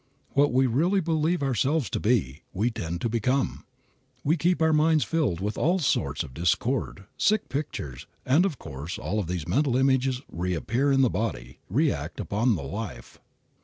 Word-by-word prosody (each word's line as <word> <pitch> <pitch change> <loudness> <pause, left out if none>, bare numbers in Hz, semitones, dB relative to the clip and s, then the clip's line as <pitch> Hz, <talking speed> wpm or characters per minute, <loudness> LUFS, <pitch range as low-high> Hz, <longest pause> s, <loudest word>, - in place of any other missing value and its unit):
What 145 +1 +3
we 130 +2 +3
really 165 - +2
believe 165 -1 0
ourselves 135 +1 +1
to - - -1
be, 90 - 0
we 110 +6 0
tend 85 -7 -4
to - - +1
become. 125 +4 0 0.6
We 155 +4 +3
keep 175 +2 +1
our 160 -1 +3
minds 155 0 +4
filled 155 - 0
with 105 +2 -3
all 175 +5 +3
sorts 75 - 0
of 70 -5 -10
discordant, 95 - -1
sick 215 0 +2
pictures, 125 - -5 0.2
and 145 +7 +4
of 185 -8 -1
course 75 +2 -6
all 105 +3 -2
of 100 - -2
these 90 -3 -3
mental 135 -2 +2
images 130 -1 +2
reappear 90 - -1
in 135 0 +4
the 125 - +4
body, 90 - -3
react - - 0
upon 110 +3 +1
the 80 - -5
life. 100 +10 -7
125 Hz, 170 wpm, -26 LUFS, 90-150 Hz, 0.6 s, minds